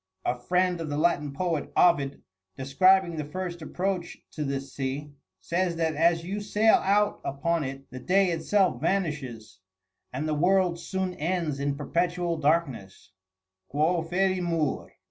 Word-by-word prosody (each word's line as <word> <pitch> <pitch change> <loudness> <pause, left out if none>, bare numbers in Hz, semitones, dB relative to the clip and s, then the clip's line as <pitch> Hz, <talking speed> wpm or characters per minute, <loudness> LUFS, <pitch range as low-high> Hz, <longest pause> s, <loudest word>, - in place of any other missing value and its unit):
A - - +2
friend 180 +5 +1
of 160 - -4
the 145 - -2
Latin 150 -3 +1
poet, 165 +1 -2
Ovid, 140 -6 +3 0.3
describing 180 +5 +3
the 155 - -2
first 175 +3 -5
approach 180 +2 -3
to 150 - -4
this 135 -1 -4
sea, 140 +2 -4 0.3
says 170 - -1
that 165 -1 0
as 165 +2 +3
you 200 +3 -3
sail 210 +2 +4
out 205 +2 +1
upon 165 +4 -1
it 135 0 -6
the 130 - -7
day 185 +7 +2
itself 170 -4 +1
vanishes, 140 - -2 0.5
and 140 +5 -3
the 155 - 0
world 175 +2 +2
soon 190 0 -3
ends 165 -3 -2
in 140 0 -1
perpetual 170 +3 -1
darkness: 135 - -1 0.6
"Quo 160 +4 +1
Ferimur? 175 -3 0
165 Hz, 145 wpm, -27 LUFS, 145-180 Hz, 0.6 s, sail